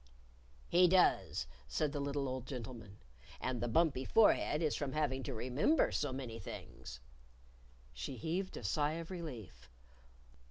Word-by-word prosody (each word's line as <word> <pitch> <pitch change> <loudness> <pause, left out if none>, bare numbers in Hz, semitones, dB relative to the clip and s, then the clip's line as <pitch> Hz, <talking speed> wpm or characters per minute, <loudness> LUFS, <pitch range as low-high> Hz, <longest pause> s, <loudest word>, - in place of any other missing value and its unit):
"He 180 +1 +6
does," 180 - +3 0.2
said 140 - 0
the 145 - -3
little 140 0 -1
old 130 -1 -4
gentleman. 115 -6 -7 0.4
"And 125 -3 -2
the 120 - 0
bumpy 135 +1 +3
forehead 165 - +4
is 155 - +1
from 140 -3 -2
having 145 -4 0
to 135 0 -4
remember 130 - +2
so 145 - 0
many 125 -4 -5
things." - - -8 0.9
She 65 - -5
heaved 175 - -2
a - - -7
sigh 145 +9 +1
of 165 +2 -5
relief. 120 - -7
135 Hz, 145 wpm, -36 LUFS, 120-155 Hz, 0.9 s, He